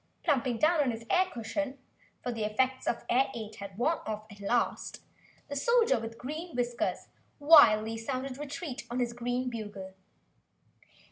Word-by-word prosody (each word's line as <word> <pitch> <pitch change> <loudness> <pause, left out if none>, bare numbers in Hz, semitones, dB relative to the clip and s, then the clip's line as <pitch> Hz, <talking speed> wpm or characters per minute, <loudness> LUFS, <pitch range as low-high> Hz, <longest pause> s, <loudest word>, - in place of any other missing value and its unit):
Plumping 255 -7 +1
down 315 +5 +3
on 275 - +2
his 230 -1 -5
air 370 0 +4
cushion, 260 +5 -3 0.5
for 245 - -2
the 225 -2 -3
effects 255 +5 0
of 235 - 0
the - - -2
air 260 +2 +4
ade 220 -2 -7
had 200 -1 -8
worn 315 +8 +1
off 215 0 -4
at 205 - -13
last, 235 +4 -1 0.4
the 285 - -5
Soldier 450 - +3
with 225 0 -7
Green 310 +6 -6
Whiskers 240 -1 -1 0.3
wildly 225 -8 +6
sounded 255 +3 -4
retreat 290 -4 -6
on 240 - -3
his 240 -1 0
green 245 +1 -2
bugle. 205 -5 -6
245 Hz, 160 wpm, -30 LUFS, 225-285 Hz, 0.5 s, wildly